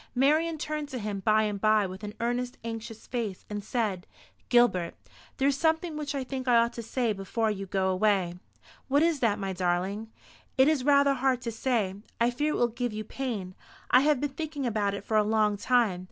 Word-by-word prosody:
Marian 310 +5 +3
turned 305 -1 -4
to 260 - -5
him 210 -3 -3
by 215 +2 +3
and 205 -2 -2
by 215 -1 +4
with 190 +2 -7
an 210 +1 -6
earnest 245 +1 -2
anxious 225 -1 -6
face, 225 -6 -4
and 205 -1 -4
said, 210 -5 -2 0.4
"Gilbert, 240 -9 +3 0.4
there 270 - +2
is 280 - +3
something 320 +2 0
which 295 -1 -3
I 275 - -1
think 260 0 -5
I 245 - +5
ought 235 +1 +3
to 235 - -5
say 245 +3 -3
to - - +3
you - - +2
before 215 +3 -1
you 195 -1 -5
go 190 -1 0
away." 185 -2 +2 0.5
"What 285 +3 +3
is 330 -3 +2
that, 225 -4 +2
my 195 -2 -3
darling?" 185 +5 -1 0.5
"It 265 +1 +6
is 305 -4 +2
rather 280 0 +5
hard 265 -1 +1
to 235 - -3
say. 225 -4 0 0.3
I 235 +1 +3
fear 295 +5 0
it - - -1
will 240 - +3
give 240 0 -3
you 215 0 -4
pain. 215 -6 -4 0.4
I 250 - +8
have 290 0 +3
been 290 0 -2
thinking 300 -1 -4
about 205 -4 0
it 200 - -7
for 215 0 0
a 210 - +5
long 210 -1 +2
time. 225 -4 +2
230 Hz, 220 wpm, -28 LUFS, 205-270 Hz, 0.5 s, I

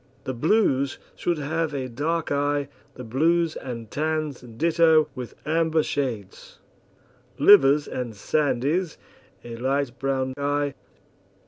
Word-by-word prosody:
The 130 - -3
blues 140 - +1 0.2
should 175 -2 -1
have 155 +1 -2
a 130 -2 -3
dark 150 +7 -2
eye, 145 0 0 0.3
the 125 - -8
blues 160 +7 +1
and 115 -4 -7
tans 155 -2 -2
ditto, 160 +6 +3
with 125 -2 -7
amber 160 0 +2
shades; 115 -11 -4 0.8
livers 145 -7 +6
and 120 -3 -5
sandies, 150 - 0 0.5
a 115 -1 -8
light 135 0 -1
brown 130 -1 -1
eye. 145 0 0
145 Hz, 115 wpm, -24 LUFS, 130-160 Hz, 0.8 s, livers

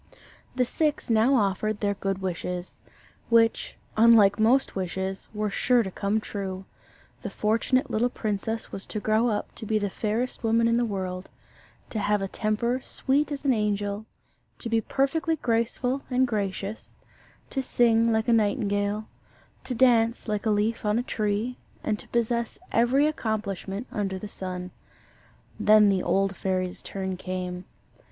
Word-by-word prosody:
The 250 0 +2
six 295 0 -1
now 230 +5 +4
offered 210 -1 +1
their 200 -1 +1
good 195 -1 -3
wishes 180 0 -4 0.5
which, 230 -1 +3 0.2
unlike 215 -3 +6
most 245 +5 +3
wishes, 190 +1 -3
were 210 -1 -2
sure 245 +3 +3
to 190 - -5
come 200 +3 0
true. 190 -3 -5 0.6
The - - -4
fortunate 230 +5 +1
little 235 +3 +2
princess 220 0 -3
was 195 - -4
to 215 - -3
grow 215 +3 +2
up 210 -3 -2
the 215 -2 -1
fairest 230 +6 -2
woman 230 +1 +3
in 230 0 +3
the 240 - +2
world; 185 -3 -4 0.6
to 220 - -2
have 210 0 +1
a 195 - -2
temper 235 +5 -1
sweet 285 +3 0
as 285 0 -5
an 270 - +4
angel; 205 -1 -1 0.5
to 235 - -5
be 225 0 +2
perfectly 315 +7 0
graceful 245 +1 0
and 255 0 +3
gracious; 205 -1 -4 0.5
to 270 - 0
sing 230 -2 +3
like 220 +1 +1
a 235 - +4
nightingale; 205 -1 +1 0.6
to 250 - -3
dance 230 -2 +3
like 210 0 -1
a - - +3
leaf 215 +2 +1
on 210 +1 +1
a 240 - 0
tree; 215 +2 -2 0.2
and 210 -1 -1
to - - -10
possess 235 0 -1
every 250 +5 +3
accomplishment 220 - -2
under 195 -3 -2
the 210 - -6
sun. 180 -2 -6 0.9
Then 210 -1 +6
the 190 -2 +2
old 195 0 +1
fairy's 185 -1 -2
turn 190 -1 -4
came. 180 -1 -4
215 Hz, 150 wpm, -26 LUFS, 200-235 Hz, 0.9 s, unlike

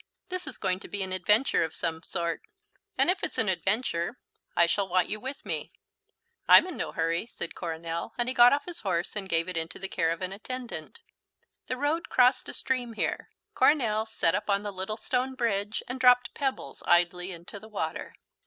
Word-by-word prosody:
"This 365 0 -4
is - - -5
going 185 0 0
to - - -10
be 200 -1 -3
an 185 0 -4
adventure 210 +7 +3
of 160 - -4
some 160 -2 -2
sort, 170 -1 -3 0.6
and - - +4
if 370 - -4
it's - - -2
an 225 - +2
adventure 190 +1 0 0.4
I 170 - +6
shall 195 +3 0
want 180 0 +2
you 215 - -3
with 265 +4 -7
me." - - -4 0.7
"I'm - - +9
in 365 -4 -6
no - - -3
hurry," 165 +5 -1
said 175 - -6
Coronel, 165 +2 -4
and 240 0 0
he 255 - 0
got 245 -1 +8
off 285 - +1
his 350 -1 -6
horse 180 -2 -1
and 195 -2 -4
gave 165 0 +2
it 180 -2 -3
into 165 0 -3
the 195 - -4
care 165 -3 0
of 165 +2 -2
an 185 +1 -3
attendant. 255 - -7 0.7
The 255 - -2
road 295 +5 -1
crossed 250 +1 +4
a - - -3
stream 250 -3 -2
here. - - -2 0.2
Coronel 225 -7 +3
sat 220 -7 +2
up 205 +2 -2
on 200 0 +2
the 205 -1 -4
little 190 +3 -3
stone 255 +3 -1
bridge 210 -4 -1
and 255 +1 -5
dropped 250 -1 +5
pebbles 270 -2 -3
idly 180 +1 +3
into 175 +3 -9
the 220 +2 -13
water. 160 -7 -4
205 Hz, 205 wpm, -28 LUFS, 175-250 Hz, 0.7 s, I'm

